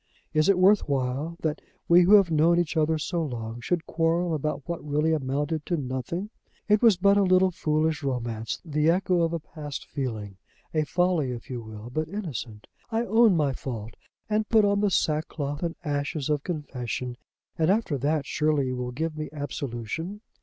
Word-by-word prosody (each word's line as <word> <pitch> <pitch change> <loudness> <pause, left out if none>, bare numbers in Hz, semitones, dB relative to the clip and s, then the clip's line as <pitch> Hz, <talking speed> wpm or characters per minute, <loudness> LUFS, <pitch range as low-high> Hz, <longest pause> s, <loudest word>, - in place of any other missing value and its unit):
Is 155 +3 +3
it 195 - +5
worth 190 -1 +4
while 140 +5 -1
that 155 -1 -1 0.3
we 175 +1 +7
who 190 +4 +7
have 195 -5 +5
known 165 +2 +4
each 165 -1 -1
other 160 0 +2
so 165 +2 -2
long 120 -4 -5
should 170 +6 -1
quarrel 165 +1 +1
about 150 -2 -3
what 170 -1 -4
really 150 +2 +1
amounted 145 +2 -1
to 175 - 0
nothing? 140 - -4 0.4
It 210 -1 +4
was 225 -6 +6
but 200 +2 +4
a - - +5
little 185 0 +4
foolish 155 -2 0
romance, 120 -5 -3
the 150 0 +1
echo 180 0 +2
of 165 -1 +1
a 170 - -1
past 150 -2 -7
feeling, 110 -8 -5 0.4
a 155 -1 +1
folly 175 -4 +1
if 120 0 -6
you 120 -2 -4
will, 110 +1 -9
but 155 +4 -1
innocent. 130 - -5 0.2
I 230 +1 0
own 220 -3 +5
my 145 -3 +1
fault 115 -4 -6 0.3
and 215 0 0
put 220 -2 +5
on 200 0 +2
the 205 0 +2
sackcloth 150 -4 -1
and 170 -2 -2
ashes 145 0 -1
of 145 -1 +1
confession, 125 -6 -4 0.4
and, 160 +1 +1
after 200 -6 +2
that, 145 +2 0
surely 150 -3 +1
you 130 - -3
will 125 0 -3
give 155 +5 -3
me 155 0 -4
absolution. 145 - -5
155 Hz, 185 wpm, -26 LUFS, 135-175 Hz, 0.4 s, we